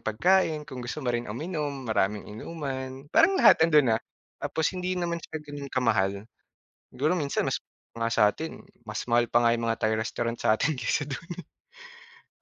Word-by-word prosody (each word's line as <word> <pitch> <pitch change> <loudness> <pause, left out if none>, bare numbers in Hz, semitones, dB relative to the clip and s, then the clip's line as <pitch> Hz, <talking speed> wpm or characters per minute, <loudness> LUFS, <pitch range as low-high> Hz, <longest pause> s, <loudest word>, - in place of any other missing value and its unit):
pagkain 155 - +2
kung 130 -4 -8
gusto 125 +4 -5
mo 120 - +1
rin 120 -1 -2
uminom, 145 +1 -4
maraming 105 -2 0
inuman, 130 +2 -6
parang 380 +4 +5
lahat 375 - +7
'ando'n 150 -7 +5
na. 110 - +1 0.4
Tapos 160 -1 0
hindi 185 0 -2
naman 170 -1 -1
siya 160 - -6
gano'n 145 -2 -8
ka-mahal, 100 -5 +1 0.7
siguro 145 +7 +1
minsan 145 -5 -1
mas - - 0 0.4
nga 115 0 -1
sa'tin, 115 +11 +1 0.2
mas 110 0 -4
mahal 120 0 +4
pa 120 - +4
nga 115 - +4
yung 115 - -3
mga 115 0 0
Thai 110 0 +2
restaurant 115 +1 -2
sa'tin 125 +8 +1
kaysa 125 +4 -1
do'n, 145 +5 -6 0.9
eh. - - -43
130 Hz, 170 wpm, -27 LUFS, 115-155 Hz, 0.9 s, lahat